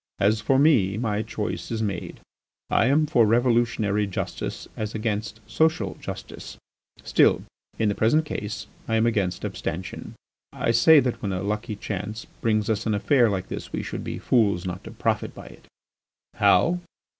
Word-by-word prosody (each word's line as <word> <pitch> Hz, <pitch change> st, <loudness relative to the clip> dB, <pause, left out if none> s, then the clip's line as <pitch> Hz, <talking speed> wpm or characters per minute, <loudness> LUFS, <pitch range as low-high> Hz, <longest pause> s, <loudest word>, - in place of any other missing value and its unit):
As 105 Hz, +2 st, +2 dB
for 135 Hz, +4 st, +2 dB
me, 120 Hz, -10 st, +4 dB
my 110 Hz, -2 st, -1 dB
choice 110 Hz, -1 st, -4 dB
is 110 Hz, -1 st, -2 dB
made. 100 Hz, -4 st, -4 dB, 0.5 s
I 110 Hz, -, +4 dB
am 150 Hz, +3 st, +3 dB
for 120 Hz, -5 st, +3 dB
revolutionary 115 Hz, -3 st, +2 dB
justice 95 Hz, -, -4 dB
as 110 Hz, 0 st, -4 dB
against 110 Hz, 0 st, -3 dB
social 160 Hz, -, +1 dB
justice. -, -, -8 dB, 0.5 s
Still, -, -, +3 dB, 0.3 s
in 110 Hz, -, +1 dB
the 100 Hz, -, +2 dB
present 135 Hz, +10 st, +2 dB
case 105 Hz, -6 st, -5 dB, 0.2 s
I 115 Hz, -, 0 dB
am 110 Hz, +1 st, +3 dB
against 100 Hz, -6 st, 0 dB
abstention. 90 Hz, +4 st, -5 dB, 0.4 s
I -, -, 0 dB
say 140 Hz, +7 st, +7 dB
that 125 Hz, -2 st, -2 dB
when 100 Hz, -, -2 dB
a 95 Hz, 0 st, -2 dB
lucky 105 Hz, +1 st, -2 dB
chance 105 Hz, +2 st, -5 dB, 0.2 s
brings 110 Hz, -2 st, +1 dB
us 110 Hz, 0 st, -1 dB
an 110 Hz, -, +1 dB
affair 120 Hz, +3 st, +3 dB
like 95 Hz, -2 st, -3 dB
this -, -, -6 dB
we -, -, -3 dB
should -, -, -5 dB
be -, -, -4 dB
fools 100 Hz, -7 st, +2 dB
not 90 Hz, 0 st, -5 dB
to -, -, -8 dB
profit -, -, -1 dB
by -, -, -10 dB
it. -, -, -14 dB, 0.7 s
"How? 180 Hz, +1 st, +3 dB
110 Hz, 170 wpm, -25 LUFS, 100-120 Hz, 0.7 s, say